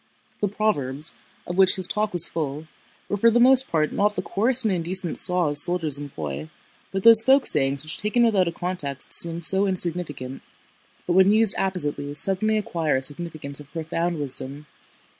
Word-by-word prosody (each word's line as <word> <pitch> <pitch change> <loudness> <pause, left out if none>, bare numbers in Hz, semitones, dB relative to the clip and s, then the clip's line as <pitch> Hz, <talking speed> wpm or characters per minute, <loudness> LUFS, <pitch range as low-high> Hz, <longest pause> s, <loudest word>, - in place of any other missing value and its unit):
The 205 - 0
proverbs, 155 -9 -1 0.3
of 175 - -6
which 190 -1 +4
his 185 - 0
talk 210 0 -2
was 175 -2 +8
full, 150 -1 -5 0.4
were 205 - -2
for 230 +4 +4
the 235 +1 +2
most 260 +1 +5
part 155 -2 0
not 205 +1 0
the 185 - -3
coarse 235 +8 0
and 210 - +1
indecent 175 0 -2
saws 170 -6 0
soldiers 160 -5 -2
employ, 80 - -7 0.4
but 195 0 -4
those 230 -1 +10
folk 265 +3 +3
sayings 140 -1 0
which 155 +1 -6
taken 215 +3 +1
without 200 -6 +2
a - - -1
context 170 -6 -4
seem 170 0 -2
so 195 +4 +1
insignificant, 170 -8 -3 0.6
but 175 - -1
when 190 +2 +5
used 220 -1 +4
appositely 145 -6 -3
suddenly 195 +6 0
acquire 165 -8 -2
a - - -3
significance 145 -1 -5
of 145 -2 -14
profound 165 +1 -3
wisdom. 140 +1 -3
175 Hz, 175 wpm, -23 LUFS, 145-200 Hz, 0.6 s, those